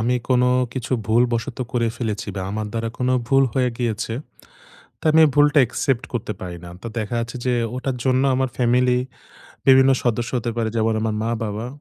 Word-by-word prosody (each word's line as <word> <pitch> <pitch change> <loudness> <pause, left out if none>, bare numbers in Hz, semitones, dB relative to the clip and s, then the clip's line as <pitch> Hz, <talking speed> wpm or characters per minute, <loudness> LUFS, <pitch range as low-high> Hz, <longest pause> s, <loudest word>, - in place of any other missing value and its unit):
আমি 120 +3 +1
কোন 125 -1 +3 0.3
কিছু 130 0 -4
ভুলবশত 120 +3 +1
করে 115 -2 +1
ফেলেছি 105 -4 -3
বা, - - -2
আমার 110 +1 -3
দ্বারা 115 0 -2
কোন 125 0 0 0.2
ভুল 135 0 +5
হয়ে 125 -2 +2
গিয়েছে। 115 -2 -2 0.9
তো - - -16
আমি 160 +1 +5
এই - - +4
ভুলটা 145 0 +5
accept 135 +1 -1
করতে 110 -2 -3
পারি 90 -1 -6
না। - - -9
তো - - -6
দেখা 110 +2 -3
যাচ্ছে 115 +2 -5
যে 125 - +2 0.2
ওটার 130 0 -2
জন্য 130 0 +2
আমার 130 0 +1
ফ্যামিলি 125 0 +3 0.7
বিভিন্ন 130 0 +7
সদস্য 120 0 0
হতে 120 0 -3
পারে 115 -1 0
যেমন: 110 0 +1
আমার 110 -1 -1
মা-বাবা। 115 -1 -3
120 Hz, 185 wpm, -22 LUFS, 115-130 Hz, 0.9 s, বিভিন্ন